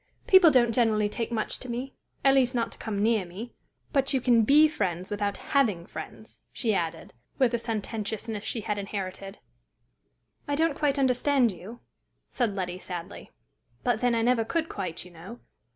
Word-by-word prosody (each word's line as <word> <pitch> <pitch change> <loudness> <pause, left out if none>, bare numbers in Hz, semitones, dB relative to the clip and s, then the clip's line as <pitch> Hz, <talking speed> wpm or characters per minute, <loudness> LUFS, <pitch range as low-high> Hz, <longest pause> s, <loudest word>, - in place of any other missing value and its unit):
"People 375 -3 +8
don't 240 -5 +4
generally 220 -3 +2
take 230 +3 -4
much 220 -2 -2
to 255 - -9
me 250 +3 -4 0.3
at 270 - +7
least, 255 -2 +3
not 230 -1 0
to - - -15
come 205 -2 -2
near 220 -2 +3
me. 190 +7 -9 0.4
But 275 0 +2
you - - +3
can 240 -2 +4
be 295 +8 +6
friends 185 - -3
without 205 -1 -1 0.2
having 215 -12 +2
friends," - - -9
she 225 -3 0
added, 165 -3 -3 0.2
with 255 -3 +3
a 235 - +1
sententiousness 220 -1 -4
she 225 - -3
had 210 0 -2
inherited. 195 -1 -5 1.1
"I 285 - 0
don't 320 -1 +1
quite 285 -1 +1
understand 260 -1 +3
you," 195 +7 -11 0.5
said 230 -6 0
Letty, 180 -2 -3
sadly; 175 -3 -7 0.5
"but, 245 -3 +1
then, 245 -1 +2
I 230 - +1
never 240 -1 +3
could 325 +7 -2
quite, 180 -5 -5
you 180 - -13
know. 180 +8 -11
225 Hz, 175 wpm, -27 LUFS, 200-255 Hz, 1.1 s, People